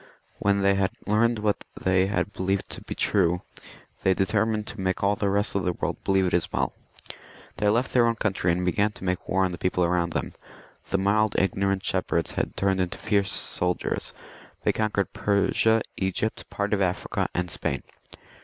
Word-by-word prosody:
When 100 Hz, 0 st, +2 dB
they 100 Hz, 0 st, +5 dB
had 95 Hz, -1 st, +1 dB, 0.2 s
learned 115 Hz, +3 st, +3 dB
what 105 Hz, -1 st, 0 dB, 0.2 s
they 95 Hz, 0 st, +2 dB, 0.3 s
believed 95 Hz, +1 st, -1 dB
to -, -, -5 dB
be -, -, -6 dB
true, 90 Hz, -3 st, +2 dB, 0.6 s
they 95 Hz, -1 st, +3 dB
determined 105 Hz, +2 st, +1 dB
to 110 Hz, -2 st, -7 dB
make 95 Hz, 0 st, -1 dB
all 100 Hz, +1 st, +3 dB
the 100 Hz, 0 st, 0 dB
rest 100 Hz, +1 st, +1 dB
of 100 Hz, -, 0 dB
the 90 Hz, -, 0 dB
world -, -, -3 dB
believe 95 Hz, -1 st, +3 dB
it 90 Hz, -, -1 dB
as 85 Hz, -, +1 dB
well. -, -, 0 dB, 0.8 s
They 105 Hz, +1 st, +2 dB
left 120 Hz, +5 st, +1 dB
their 120 Hz, -2 st, +5 dB
own 115 Hz, -, +1 dB
country 95 Hz, -5 st, 0 dB
and 90 Hz, +1 st, 0 dB
began 100 Hz, +4 st, +1 dB
to -, -, -11 dB
make 90 Hz, -1 st, -2 dB
war 95 Hz, 0 st, +3 dB
on 90 Hz, -, -1 dB
the 85 Hz, -, -6 dB
people 90 Hz, -1 st, +1 dB
round. 85 Hz, -1 st, 0 dB, 0.7 s
The 100 Hz, -, +2 dB
mild 105 Hz, +2 st, +2 dB
ignorant 95 Hz, 0 st, +1 dB
shepherds -, -, 0 dB
had -, -, -3 dB
turned 95 Hz, -1 st, +2 dB
into 90 Hz, -1 st, -2 dB
fierce 100 Hz, -3 st, +1 dB
soldiers; 90 Hz, 0 st, -1 dB, 0.5 s
they -, -, +2 dB
conquered 110 Hz, -2 st, -1 dB
Persia, 105 Hz, +2 st, +2 dB
Egypt, 95 Hz, +3 st, -2 dB
part 100 Hz, +1 st, -2 dB
of 100 Hz, -, +1 dB
Africa, 90 Hz, -1 st, -1 dB, 0.2 s
Spain. 90 Hz, -, -3 dB
100 Hz, 180 wpm, -26 LUFS, 95-105 Hz, 0.8 s, they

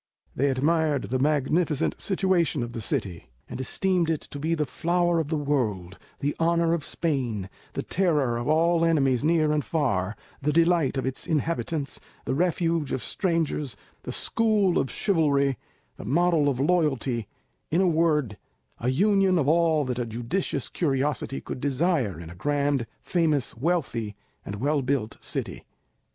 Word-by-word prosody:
They 140 Hz, +2 st, +2 dB
admired 150 Hz, +2 st, +1 dB
the 130 Hz, +1 st, -2 dB
magnificent 150 Hz, +2 st, +1 dB
situation 185 Hz, -8 st, +1 dB
of 120 Hz, -, -5 dB
the 115 Hz, -, -4 dB
city, 90 Hz, -5 st, -3 dB, 0.2 s
and -, -, -6 dB
esteemed 180 Hz, +4 st, +1 dB
it 160 Hz, -2 st, 0 dB
to 145 Hz, -, -6 dB
be 160 Hz, +3 st, 0 dB
the 150 Hz, -2 st, 0 dB
flower 175 Hz, +5 st, +1 dB
of 160 Hz, -, -1 dB
the 160 Hz, 0 st, -1 dB
world, 110 Hz, -11 st, -1 dB, 0.2 s
the 145 Hz, +1 st, -1 dB
honour 170 Hz, 0 st, +2 dB
of 170 Hz, -3 st, -1 dB
Spain, 125 Hz, -, -2 dB, 0.2 s
the -, -, -3 dB
terror 150 Hz, -10 st, +1 dB
of 120 Hz, -, -4 dB
all 165 Hz, +2 st, +3 dB
enemies 135 Hz, -6 st, +2 dB
near 155 Hz, -1 st, +3 dB
and 150 Hz, -1 st, +1 dB
far, 115 Hz, -, 0 dB, 0.3 s
the 150 Hz, +2 st, +1 dB
delight 165 Hz, -3 st, +3 dB
of 130 Hz, -, -1 dB
its 130 Hz, 0 st, -1 dB
inhabitants, 160 Hz, -2 st, -1 dB, 0.3 s
the -, -, -1 dB
refuge 165 Hz, -1 st, 0 dB
of 130 Hz, -, -2 dB
strangers, 160 Hz, -, -1 dB, 0.2 s
the -, -, -6 dB
school 215 Hz, -5 st, +2 dB
of 135 Hz, -, -1 dB
chivalry, 140 Hz, -, +1 dB, 0.4 s
the -, -, -8 dB
model 160 Hz, -, +3 dB
of 130 Hz, -3 st, -2 dB
loyalty, 135 Hz, -, +1 dB, 0.4 s
in 165 Hz, -, +2 dB
a 190 Hz, -, +4 dB
word, 155 Hz, -, +1 dB, 0.4 s
a 120 Hz, -, 0 dB
union 195 Hz, +5 st, +3 dB
of 145 Hz, -4 st, +1 dB
all 160 Hz, -2 st, +3 dB
that 125 Hz, -1 st, -2 dB
a 120 Hz, -, -1 dB
judicious 120 Hz, -, -2 dB
curiosity 135 Hz, -3 st, -1 dB
could 125 Hz, -, -7 dB
desire 140 Hz, -, 0 dB
in 85 Hz, -1 st, -9 dB
a -, -, -11 dB
grand, 140 Hz, +2 st, 0 dB, 0.2 s
famous, 155 Hz, -6 st, 0 dB
wealthy, 120 Hz, -, -1 dB, 0.3 s
and 100 Hz, -, -6 dB
well 140 Hz, +7 st, 0 dB
built 125 Hz, -4 st, -1 dB
city. -, -, -4 dB
150 Hz, 160 wpm, -26 LUFS, 130-170 Hz, 0.4 s, a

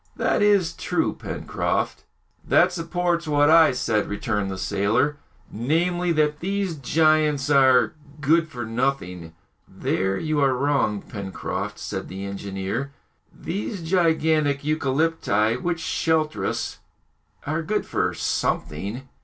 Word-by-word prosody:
"That -, -, +1 dB
is 200 Hz, -5 st, +3 dB
true, -, -, -1 dB
Pencroft." -, -, -3 dB, 0.4 s
"That 180 Hz, +1 st, +4 dB
supports 175 Hz, 0 st, -1 dB
what 145 Hz, 0 st, +4 dB
I 165 Hz, -1 st, +7 dB
said," 115 Hz, -4 st, 0 dB
returned 105 Hz, -1 st, -2 dB
the 95 Hz, -, -4 dB
sailor, 110 Hz, +10 st, +1 dB, 0.3 s
"namely, 170 Hz, +9 st, 0 dB
that 150 Hz, -1 st, +1 dB
these 195 Hz, -1 st, -2 dB
giants 150 Hz, 0 st, +2 dB
are 130 Hz, -3 st, +5 dB, 0.3 s
good 160 Hz, +3 st, +3 dB
for 120 Hz, -6 st, -6 dB
nothing!" 110 Hz, -9 st, -2 dB, 0.3 s
"There 95 Hz, +1 st, -1 dB
you 155 Hz, -2 st, -1 dB
are 135 Hz, -2 st, +3 dB
wrong, 130 Hz, -6 st, 0 dB
Pencroft," 100 Hz, -2 st, -5 dB
said -, -, -5 dB
the 95 Hz, +1 st, -6 dB
engineer; 100 Hz, +6 st, -4 dB, 0.4 s
"these 195 Hz, +1 st, -5 dB
gigantic 160 Hz, -4 st, +2 dB
eucalypti, 140 Hz, -7 st, +1 dB
which 175 Hz, -1 st, -1 dB
shelter 160 Hz, -1 st, 0 dB
us, -, -, -3 dB, 0.7 s
are 155 Hz, +3 st, -1 dB
good 210 Hz, +6 st, -1 dB
for -, -, -1 dB
something." 100 Hz, -, -2 dB
145 Hz, 120 wpm, -24 LUFS, 110-165 Hz, 0.7 s, I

